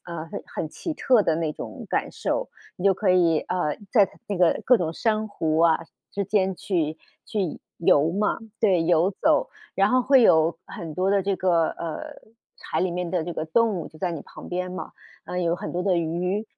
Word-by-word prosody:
呃， 170 Hz, -2 st, -6 dB
很 -, -, -7 dB
很 155 Hz, -, -4 dB
奇 325 Hz, -, -5 dB
特 250 Hz, -6 st, +3 dB
的 160 Hz, -4 st, +1 dB
那 160 Hz, -2 st, -1 dB
种 -, -, -8 dB
感 -, -, -1 dB
受， -, -, -2 dB, 0.3 s
你 180 Hz, -, -7 dB
就 195 Hz, -, +6 dB
可 190 Hz, +1 st, -1 dB
以， 170 Hz, -3 st, +4 dB
呃， 175 Hz, -5 st, -2 dB, 0.2 s
在 205 Hz, -5 st, +5 dB, 0.2 s
那 200 Hz, -, -2 dB
个 175 Hz, -2 st, +3 dB
各 250 Hz, -, +6 dB
种 165 Hz, -6 st, -2 dB
珊 215 Hz, +2 st, 0 dB
瑚 160 Hz, -5 st, -1 dB
啊， 165 Hz, -1 st, +5 dB, 0.3 s
之 200 Hz, 0 st, -2 dB
间 190 Hz, -1 st, +1 dB
去 160 Hz, -5 st, -1 dB, 0.3 s
去 195 Hz, -8 st, -3 dB, 0.2 s
游 160 Hz, -2 st, +4 dB
嘛， 205 Hz, +4 st, 0 dB, 0.2 s
对， 190 Hz, -6 st, +3 dB
游 175 Hz, +3 st, +3 dB
走。 305 Hz, -1 st, +3 dB, 0.3 s
然 195 Hz, +1 st, +4 dB
后 255 Hz, 0 st, +3 dB
会 265 Hz, -1 st, +5 dB
有 165 Hz, -5 st, +4 dB
很 165 Hz, -2 st, -7 dB
多 185 Hz, +4 st, 0 dB
的 200 Hz, -1 st, +3 dB
这 195 Hz, 0 st, 0 dB
个， 170 Hz, -3 st, +2 dB
呃， 165 Hz, -2 st, -5 dB, 0.6 s
海 160 Hz, -, -2 dB
里 185 Hz, -1 st, +1 dB
面 180 Hz, 0 st, -3 dB
的 180 Hz, -3 st, 0 dB
这 175 Hz, -, -4 dB
个 155 Hz, -, -3 dB
动 220 Hz, +4 st, +2 dB
物 165 Hz, -, -5 dB
就 155 Hz, -, -17 dB
在 180 Hz, 0 st, -1 dB
你 160 Hz, -, -5 dB
旁 -, -, -12 dB
边 180 Hz, 0 st, -3 dB
嘛， 185 Hz, -, -6 dB, 0.3 s
啊， 180 Hz, -, -4 dB
也 180 Hz, -, 0 dB
有 170 Hz, 0 st, +2 dB
很 -, -, -6 dB
多 180 Hz, -, -1 dB
的 185 Hz, -3 st, +2 dB
鱼。 180 Hz, +5 st, -1 dB
180 Hz, 230 characters per minute, -25 LUFS, 165-200 Hz, 0.6 s, 就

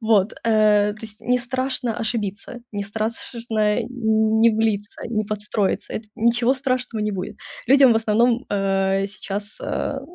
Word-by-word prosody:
Вот. 220 Hz, -3 st, +3 dB
Э, 210 Hz, -2 st, +4 dB
то 210 Hz, -, -13 dB
есть 210 Hz, 0 st, -14 dB
не 250 Hz, +1 st, +1 dB
страшно 255 Hz, -1 st, -2 dB
ошибиться, 225 Hz, +1 st, -4 dB
не 205 Hz, 0 st, -2 dB
страс 215 Hz, +3 st, -3 dB
шно, 230 Hz, -3 st, -3 dB, 0.2 s
э, 245 Hz, -, 0 dB
н 220 Hz, -2 st, +1 dB
не 230 Hz, +1 st, +6 dB
влиться, 215 Hz, -1 st, -1 dB
не 215 Hz, -2 st, -1 dB
подстроиться. 210 Hz, -1 st, -2 dB
Это 215 Hz, -1 st, -5 dB
ничего 235 Hz, +2 st, +3 dB
страшного 255 Hz, -4 st, -2 dB
не 210 Hz, 0 st, -1 dB
будет. 190 Hz, +1 st, -5 dB, 0.3 s
Людям 270 Hz, -1 st, +7 dB
в 225 Hz, -, +3 dB
основном, 230 Hz, +2 st, +2 dB
э, 195 Hz, -1 st, +1 dB
сейчас, 205 Hz, +1 st, -5 dB
а 275 Hz, -, -2 dB
220 Hz, 160 wpm, -22 LUFS, 205-240 Hz, 0.3 s, Людям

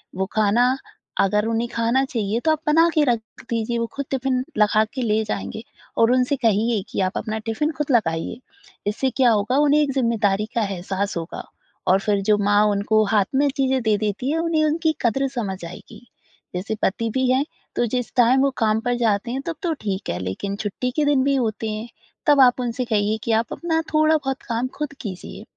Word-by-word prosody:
वो 190 Hz, +1 st, 0 dB
खाना 230 Hz, +4 st, +3 dB, 0.5 s
अगर 210 Hz, +2 st, +2 dB
उन्हें 230 Hz, +1 st, 0 dB
खाना 235 Hz, +3 st, +1 dB
चाहिए 225 Hz, -4 st, -1 dB
तो 315 Hz, -, +5 dB
आप 315 Hz, -, +1 dB
बना 325 Hz, +3 st, +5 dB
के 310 Hz, -3 st, +3 dB
रख 240 Hz, -4 st, +2 dB, 0.3 s
दीजिए 235 Hz, 0 st, -1 dB
वो 230 Hz, -, 0 dB
ख़ुद 280 Hz, -, -3 dB
टिफिन 260 Hz, -1 st, 0 dB
लगा 215 Hz, 0 st, +4 dB
के 260 Hz, -, -3 dB
ले 220 Hz, -2 st, +1 dB
जाएँगे 215 Hz, +1 st, -4 dB, 0.4 s
और 230 Hz, +1 st, +4 dB
उनसे 255 Hz, +2 st, +2 dB
कहिए 225 Hz, -2 st, +1 dB
कि -, -, -4 dB
आप 185 Hz, -, -4 dB
अपना 220 Hz, -1 st, -3 dB
टिफिन 225 Hz, +8 st, -1 dB
खुद 295 Hz, -1 st, -1 dB
लगाइए। 165 Hz, -4 st, 0 dB, 0.5 s
इससे 260 Hz, +6 st, 0 dB
क्या 255 Hz, -3 st, +5 dB
होगा 215 Hz, +5 st, +1 dB
उन्हें 295 Hz, +1 st, +4 dB
एक 290 Hz, -, +1 dB
ज़िम्मेदारी 215 Hz, -5 st, +1 dB
का 235 Hz, -, +2 dB
एहसास 195 Hz, +1 st, -3 dB
होगा 165 Hz, 0 st, -5 dB, 0.4 s
और 190 Hz, +1 st, +5 dB
फ़िर 200 Hz, 0 st, 0 dB
जो 210 Hz, -, +5 dB
माँ 205 Hz, +1 st, +3 dB
उनको 215 Hz, +2 st, +2 dB
हाथ 205 Hz, -3 st, +4 dB
में 285 Hz, +1 st, +3 dB
चीज़ें 265 Hz, -1 st, +1 dB
दे 215 Hz, -1 st, +3 dB
देती 215 Hz, +6 st, -2 dB
हैं 325 Hz, -, 0 dB
उन्हें 330 Hz, -2 st, +1 dB
उनकी 315 Hz, +1 st, +1 dB
कदर 270 Hz, +4 st, +1 dB
समझ 195 Hz, -6 st, -3 dB
आएगी। 175 Hz, +7 st, -11 dB, 0.5 s
जैसे 200 Hz, +5 st, -2 dB
पति 225 Hz, +3 st, 0 dB
भी 260 Hz, -1 st, +1 dB
हैं 270 Hz, +3 st, +2 dB, 0.3 s
तो 240 Hz, -, +2 dB
जिस 245 Hz, +1 st, -2 dB
टाइम 250 Hz, +2 st, +5 dB
वो 275 Hz, -, +3 dB
काम 220 Hz, -1 st, +2 dB
पर 245 Hz, 0 st, +1 dB
जाते 225 Hz, 0 st, 0 dB
हैं 265 Hz, -, -2 dB
तब 330 Hz, -, -2 dB
तो 335 Hz, -2 st, +1 dB
ठीक 195 Hz, -2 st, -3 dB
है, 90 Hz, -, -2 dB
लेकिन 95 Hz, -, -4 dB
छुट्टी 210 Hz, +5 st, -3 dB
के 305 Hz, -, +2 dB
दिन 285 Hz, -3 st, +3 dB
भी 275 Hz, 0 st, +2 dB
होते 220 Hz, -3 st, -1 dB
हैं। 215 Hz, +2 st, -5 dB, 0.4 s
तब 290 Hz, -2 st, +6 dB
आप 250 Hz, -1 st, +5 dB
उनसे 245 Hz, +1 st, -2 dB
कहिए 215 Hz, -1 st, +1 dB
कि 230 Hz, -, -1 dB
आप 230 Hz, -, -8 dB
अपना 325 Hz, -1 st, -1 dB
थोड़ा-बहुत 305 Hz, -3 st, +2 dB
काम 235 Hz, +2 st, 0 dB
ख़ुद 295 Hz, -1 st, -4 dB
कीजिए। 190 Hz, -6 st, -7 dB
230 Hz, 205 wpm, -22 LUFS, 210-265 Hz, 0.5 s, तब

